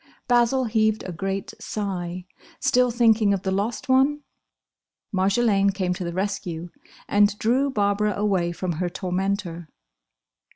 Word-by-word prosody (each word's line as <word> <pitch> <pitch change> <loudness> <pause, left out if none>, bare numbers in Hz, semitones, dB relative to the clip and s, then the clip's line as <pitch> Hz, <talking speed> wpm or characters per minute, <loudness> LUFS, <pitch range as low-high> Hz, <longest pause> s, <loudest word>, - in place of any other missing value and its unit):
Basil 245 +1 +3
heaved 220 -1 +1
a 185 - -5
great 195 +3 -4
sigh. 185 -4 -4 0.3
Still 250 0 +3
thinking 225 -3 +3
of 190 - -6
the 190 - -1
lost 210 +7 -2
one! 270 +3 +3 0.9
Marjolaine 200 +1 +3
came 185 -2 0
to 180 - -5
the 170 - -3
rescue 180 -3 -3 0.4
and 205 0 +3
drew 255 +6 +2
Barbara 210 -3 +1
away 190 -4 0
from 180 +1 -3
her 175 +2 -2
tormentor. 180 -2 -3
200 Hz, 130 wpm, -24 LUFS, 185-225 Hz, 0.9 s, Basil